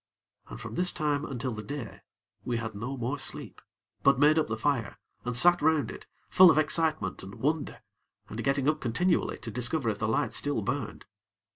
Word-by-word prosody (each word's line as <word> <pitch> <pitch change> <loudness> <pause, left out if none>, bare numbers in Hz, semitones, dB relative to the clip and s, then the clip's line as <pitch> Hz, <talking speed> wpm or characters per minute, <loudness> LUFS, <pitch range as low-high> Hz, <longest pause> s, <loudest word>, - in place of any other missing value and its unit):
And - - -9
from - - -8
this 180 +1 +1
time, 150 -1 -1
until 130 -1 -4
the 110 -2 -5
day, 115 +1 -7 0.4
we 120 -1 -2
had 110 -1 -4
no 125 +7 -5
more 130 +4 -3
sleep; - - -6 0.4
but 140 -2 +4
made 150 +3 +5
up 155 - 0
the 110 - -3
fire, 130 0 -1 0.3
and 125 0 -1
sat 175 +5 +7
round 150 -5 +2
it, - - -11 0.2
full 185 -1 +7
of - - +4
excitement 155 - 0
and 95 +1 -10
wonder, 150 +1 -2 0.4
and 115 +2 -6
getting 135 0 +1
up 155 0 +1
continually 170 +9 0
to 115 - -7
discover 125 +3 0
if 105 - -7
the 110 - -1
light 115 0 0
still 145 -6 -1
burned. - - -4
135 Hz, 190 wpm, -28 LUFS, 115-155 Hz, 0.4 s, sat